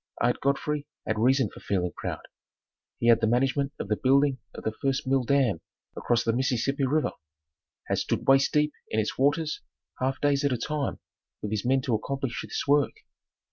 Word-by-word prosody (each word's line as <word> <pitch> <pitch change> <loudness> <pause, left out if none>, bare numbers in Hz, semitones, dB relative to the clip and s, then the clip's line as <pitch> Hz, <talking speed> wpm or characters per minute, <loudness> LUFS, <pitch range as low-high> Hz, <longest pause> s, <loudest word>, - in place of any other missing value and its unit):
Ard - - +1
Godfrey 145 +1 0 0.2
had 110 -1 -1
reason 130 0 +3
for - - -12
feeling 90 -3 -1
proud. - - -5 0.7
He 115 - -1
had 115 0 +6
the 110 - +3
management 135 +4 +1
of - - -4
the - - +1
building 140 -1 +3 0.2
of - - -8
the 110 - 0
first 135 0 0
mill 130 0 +2
dam 125 -9 +2 0.3
across 120 -1 +1
the 115 - +1
Mississippi 130 +2 0
River, 150 +3 +1 0.8
had - - 0
stood - - -2
waist 135 0 +5
deep 150 0 +2 0.2
in 110 - 0
its 110 - -2
waters, 150 +3 +1 0.4
half 130 +1 -1
days 145 -1 +2
at 140 - +2
a - - 0
time 150 +2 -2 0.5
with 105 - -3
his 110 -2 -1
men 130 +1 +3
to 130 -2 -1
accomplish 135 +3 -2
this - - -4
work. 145 0 +3
135 Hz, 185 wpm, -27 LUFS, 120-140 Hz, 0.8 s, had